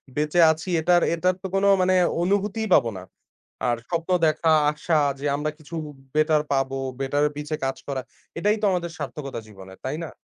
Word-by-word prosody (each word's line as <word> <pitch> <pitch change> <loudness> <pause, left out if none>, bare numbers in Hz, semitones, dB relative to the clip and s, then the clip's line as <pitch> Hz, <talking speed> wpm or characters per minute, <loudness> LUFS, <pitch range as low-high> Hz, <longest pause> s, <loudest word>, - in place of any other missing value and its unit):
বেঁচে 150 +3 0
আছি 160 +4 -5
এটার 175 +1 +4
এটার 180 +2 +1
তো - - -2
কোনো 200 +1 +3
মানে 185 0 +3 0.3
অনুভূতিই 205 +4 0
পাবো 115 - +5
না। 90 - -8 0.6
আর 120 -1 +1
স্বপ্ন 170 +1 -2 0.2
দেখা, 155 +1 +2 0.2
আশা 155 +2 -1 0.2
যে 145 - -5
আমরা 150 +1 -2
কিছু 155 +2 -10
বে 150 - -8 0.2
বেটার 155 0 +3
পাবো, 135 0 0 0.3
বেটার 145 +2 +1
পিছে 150 +1 -3
কাজ 135 - -2
করা 135 -2 -2 0.4
এটাই 210 +4 +2
তো - - +1
আমাদের 170 -2 -2
সার্থকতা 140 -6 -5
জীবনের 95 -2 -13
তাই 140 +4 -2
না? 160 - -5
155 Hz, 180 wpm, -24 LUFS, 140-180 Hz, 0.6 s, পাবো